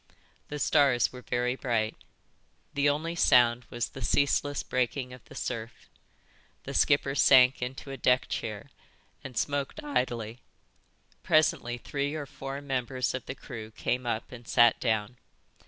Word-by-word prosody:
The 150 - -5
stars 140 -6 +3
were 125 - -9
very 125 0 -1
bright. 115 -4 -1 0.8
The 145 0 +3
only 155 +4 -1
sound 120 -6 +4
was 120 -1 -3
the - - -10
ceaseless 145 0 +1
breaking 125 +1 -2
of 125 - -12
the - - -14
surf. 115 -1 -5 0.7
The - - -6
skipper 140 -1 +3
sank 130 -2 +6
into 135 +2 -5
a 135 - -6
deck 125 -1 +2
chair 110 +4 -5 0.5
and 125 -4 -8
smoked 140 -1 -2
idly. 125 -5 -2 0.8
Presently 150 -6 +2
three 140 +4 -3
or 150 -2 -4
four 135 0 -7
members 130 -2 -2
of 130 - -5
the 130 - -5
crew 110 -4 -8
came 125 +3 -2
up 110 -1 -2
and 120 -2 -11
sat 120 0 +5
down. 110 0 -1
125 Hz, 145 wpm, -29 LUFS, 120-140 Hz, 0.8 s, sank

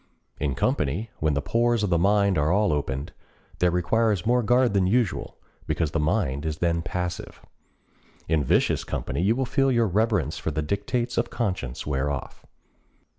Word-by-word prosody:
In 70 -3 -1
company, 100 - -1
when 75 -2 +1
the 70 - -1
pores 120 -1 +1
of 100 - 0
the 85 - +3
mind 100 +1 +3
are 75 +2 +2
all 100 -3 +2
opened, 70 -1 -3 0.5
there 90 - +4
requires 95 +3 +1
more 125 +2 +3
guard 125 +1 +3
than 95 -2 +2
usual, 115 0 0 0.3
because 80 -3 -1
the 80 - -1
mind 70 -2 0
is 80 -1 -3
then 85 -1 0
passive. 90 0 -4 0.9
In 80 -2 +1
vicious - - +2
company - - -3
you 105 +5 +3
will 130 +1 0
feel 135 +2 +1
your 120 -2 +3
reverence 100 - 0
for - - -2
the 75 0 -2
dictates 120 - -1
of - - -1
conscience 90 - -3
wear 70 -1 -1
off. 70 -2 -6
90 Hz, 175 wpm, -25 LUFS, 75-115 Hz, 0.9 s, there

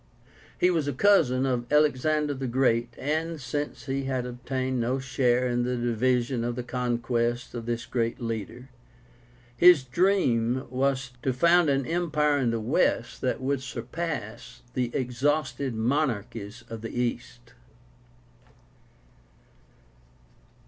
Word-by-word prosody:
He 180 - +4
was 160 -5 0
cousin 135 -11 +4
of 125 -1 -2
Alexander 150 0 +2
the 135 -1 -4
Great, 120 -2 +1
and, 160 +3 -2
since 145 +3 -4
he 135 0 -2
had 130 -2 -1
obtained 130 +1 -3
no 125 +3 0
share 130 -2 +1
in 120 0 0
the 125 +1 -1
division 120 +1 0
of 120 0 -2
the 125 - -4
conquests 120 -1 -1
of 120 -1 -6
this 120 0 -2
great 115 -2 -1
leader, 115 +2 -5 0.9
his 175 -3 +7
dream 130 - +1
was 135 0 0
to 130 - 0
found 170 +5 +4
an 135 -1 +1
empire 150 -3 +1
in 125 -3 +1
the 115 0 -1
West 110 - 0
that - - -1
would 135 0 -1
surpass 130 -1 -6
the 125 -1 0
exhausted 130 0 -1
monarchies 115 -3 -2
of 115 -1 -7
the 115 +2 -5
East. 120 0 -4
125 Hz, 125 wpm, -27 LUFS, 120-140 Hz, 0.9 s, his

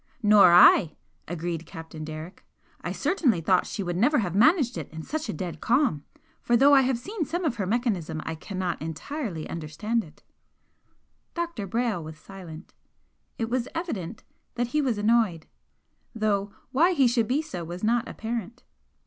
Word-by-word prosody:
"Nor 205 -4 +7
I!" 175 -2 +7 0.3
agreed 170 0 -4
Captain 160 -1 -9
Derrick 155 +3 -8 0.4
"I - - -4
certainly 280 - +1
thought 180 +3 +2
she 200 - -4
would 175 -1 -3
never 285 +10 +3
have 180 -7 -1
managed 260 - +4
it 160 -5 -6
in 160 0 -7
such 310 - -4
a - - -1
dead 165 -1 -6
calm. 240 - +1 0.4
For 240 - +3
though 280 +4 +6
I 275 - +7
have 260 -1 +1
seen 345 - -4
some 340 +5 -3
of 250 -7 -1
her 195 -4 -2
mechanism 195 -9 -1
I 160 - -3
cannot 180 0 -4
entirely 165 - -5
understand 170 +9 -2
it." 155 - -17 1.1
Dr. 340 - -3
Brayle 225 -4 -1
was 155 0 -9
silent. 175 -1 -11 0.6
It 225 - -2
was 245 +1 -1
evident 225 - -4 0.3
that 240 0 -1
he 300 - +3
was 250 -6 0
annoyed 210 -6 +2 0.7
though 205 -2 0 0.2
why 330 +8 +4
he 280 -6 +4
should 235 -2 +1
be 280 +5 +1
so 180 - -6
was 175 +3 -7
not 235 +2 +1
apparent. 230 +1 -5
210 Hz, 165 wpm, -26 LUFS, 170-250 Hz, 1.1 s, Nor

